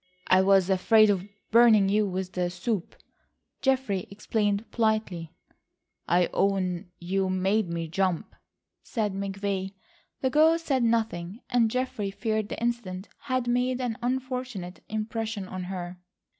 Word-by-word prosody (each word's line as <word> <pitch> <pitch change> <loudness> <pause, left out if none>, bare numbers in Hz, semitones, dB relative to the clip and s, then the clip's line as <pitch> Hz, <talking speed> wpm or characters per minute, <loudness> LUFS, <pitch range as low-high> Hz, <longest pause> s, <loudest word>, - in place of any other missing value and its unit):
"I 185 0 +5
was 190 -1 +4
afraid 215 +3 +5
of 195 0 -2 0.2
burning 225 -3 +6
you 210 +1 +2
with 185 0 -3
the 180 -1 0
soup," 180 +1 -3 0.7
Geoffrey 260 -9 +1
explained 205 +1 -1
politely. 215 -8 0 0.8
"I 175 0 +3
own 185 -2 0
you 190 +2 -1
made 190 +1 +1
me 170 -1 -3
jump," 185 +1 -1 0.5
said 215 -5 -2
McVay. 195 0 -3 0.5
The 260 - +1
girl 315 +3 +5
said 280 -6 0
nothing, 220 -4 0
and 240 -2 +4
Geoffrey 250 -4 -2
feared 215 +1 -2
the - - -5
incident 230 -5 -3 0.2
had 255 -3 0
made 250 +1 +1
an 245 -3 -1
unfortunate 250 -7 -3
impression 220 -1 -3
on 185 -1 -5
her. 180 -1 -6
205 Hz, 130 wpm, -27 LUFS, 185-235 Hz, 0.8 s, burning